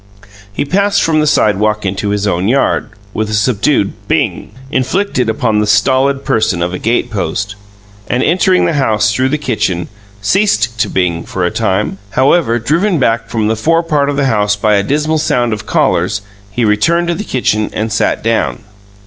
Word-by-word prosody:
He 100 - -2
passed 200 +6 +1
from 160 -1 +2
the 155 - +1
sidewalk 105 -3 +1
into 100 +2 -2
his 105 0 -1
own 95 -2 0
yard, 135 +4 +1 0.2
with 110 -1 -2
a 110 - -1
subdued 105 0 +1
"Bing!" - - -1 0.2
inflicted 130 - 0
upon 110 -1 0
the 105 - 0
stolid 130 +6 +2
person 110 -6 +1
of 90 +1 -2
a 90 - -4
gatepost, 105 -3 -2 0.5
and, 125 +2 0
entering 185 +2 +2
the - - 0
house 110 -7 +1
through 130 +4 +1
the 150 - 0
kitchen, 105 - -2 0.3
ceased 115 - +1
to - - +1
bing 85 -3 -1
for 90 -2 -3
a 90 - 0
time. 105 -2 -1
However, 130 - +2
driven 165 - +1
back 115 -4 0
from 110 -2 -1
the 110 - +1
fore 165 +9 +1
part 150 -4 0
of 145 - -1
the 140 - +1
house 105 -4 +1
by 105 +1 +1
a 100 - +3
dismal 150 +7 0
sound 120 -6 0
of 105 -1 -6
callers, 105 - +1 0.3
he 115 +3 -1
returned 110 +12 +2
to - - +2
the 205 - -4
kitchen 110 - 0
and 110 0 -3
sat 110 - 0
down. 115 +1 -1
115 Hz, 185 wpm, -14 LUFS, 105-140 Hz, 0.5 s, a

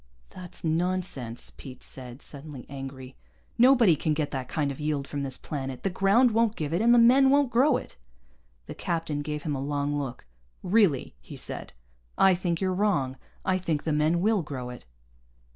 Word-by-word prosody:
"That's 180 -2 -10
nonsense," 165 -8 -2
Pete 130 -2 -11
said, 125 0 -9
suddenly 145 -3 -9
angry. 135 -1 -8 0.4
"Nobody 240 -8 +6
can 155 +1 0
get 150 -1 -2
that 130 -2 -4
kind 145 -3 -1
of 135 - -8
yield 150 -2 -2
from 145 - -4
this 135 -2 -3
planet. 135 -3 -5
The 195 - 0
ground 200 +7 +4
won't 225 0 +2
give 155 0 -3
it, 175 - +1
and 235 +1 +5
the 240 - +7
men 255 +3 +6
won't 280 -2 +3
grow 255 +3 +4
it." - - -10 0.7
The - - -7
captain 165 -4 -2
gave 150 0 -4
him 150 - -2
a 135 - -3
long 145 +1 -1
look. 125 - -6 0.4
"Really?" 185 - +2
he - - -10
said. - - -5 0.4
"I 190 -1 +6
think 175 -2 -1
you're 185 -1 0
wrong. 180 -10 +1 0.3
I 185 0 +2
think 160 -5 -2
the 155 - 0
men 155 +3 +2
will 215 0 +2
grow 130 -5 -6
it." 125 - -11
155 Hz, 185 wpm, -27 LUFS, 140-195 Hz, 0.7 s, the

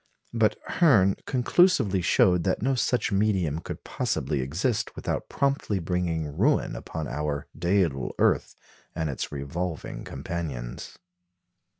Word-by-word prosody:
But 110 -2 +2
Hirn 105 - +4
conclusively 125 - +3
showed 90 0 +3
that 95 +2 0
no 135 +2 +2
such 125 -2 +1
medium 95 -7 +1
could - - -7
possibly - - -1
exist 105 - -1
without - - -3
promptly 140 -7 0
bringing 85 -4 -2
ruin 135 - +2
upon 80 -2 -5
our 75 +1 -3
"dædal 85 -6 +1
earth" - - +2 0.4
and 80 -2 -1
its 65 - -4
revolving 75 +4 -4
companions. 70 -5 -5
90 Hz, 115 wpm, -26 LUFS, 75-110 Hz, 0.4 s, Hirn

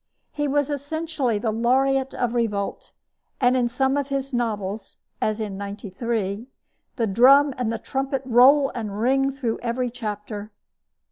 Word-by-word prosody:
He 295 -1 -2
was 290 +1 +1
essentially 290 -4 -2
the 220 +1 -1
laureate 265 +4 +1
of 245 -1 -1
revolt; 210 -4 -2 0.5
and 250 -1 +3
in 245 -2 +2
some 265 +3 +1
of 285 -1 -1
his 275 -1 -3
novels 215 -4 -3 0.2
as 215 0 0
in 205 -3 -4
Ninety 200 0 -6
Three 220 0 -2 0.5
the 230 - 0
drum 265 +7 +5
and 245 -3 -1
the 230 - -2
trumpet 270 +4 -3
roll 265 +3 +5
and 210 -4 -5
ring 270 +3 +2
through 255 -5 -3
every 245 +1 -2
chapter. 210 -3 -6
245 Hz, 150 wpm, -24 LUFS, 215-270 Hz, 0.5 s, drum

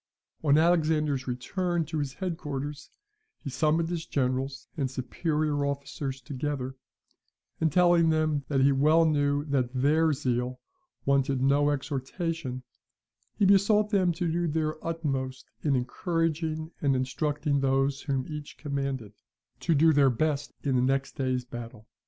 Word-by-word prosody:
On 145 -1 +5
Alexander's 155 -5 +2
return 170 +7 -1
to 160 0 -3
his 140 -3 -3
head 185 -3 -2
quarters, 145 -1 -5 0.5
he 140 - -7
summoned 160 +4 +1
his 170 -2 -2
generals 135 0 -1
and 140 -5 -1
superior 145 +4 -1
officers 140 -1 -3
together, 135 -1 -4 0.8
and 160 -1 +2
telling 175 0 +5
them 155 -2 +1
that 135 -2 +1
he 140 +1 +5
well 155 +4 +4
knew 145 -2 +1
that 130 -4 -1
THEIR 155 +4 +3
zeal 125 -2 -1 0.5
wanted 140 -1 +2
no 145 +2 +4
exhortation, 140 0 -3 0.7
he 200 - +3
besought 205 +2 +4
them 185 -4 +3
to 170 +2 -2
do 170 +1 0
their 155 0 -2
utmost 135 -6 -3
in 145 -3 +1
encouraging 160 +3 -1
and 140 -2 +2
instructing 145 +3 0
those 135 0 +1
whom 135 -3 -1
each 150 -2 -7
commanded, 140 -7 -3 0.5
to 165 - +1
do 160 +2 +5
their 140 -2 +5
best 145 +3 -1
in 135 -2 +1
the - - +3
next 135 +1 +1
day's 130 -2 -1
battle. 120 -2 -9
145 Hz, 140 wpm, -28 LUFS, 135-160 Hz, 0.8 s, On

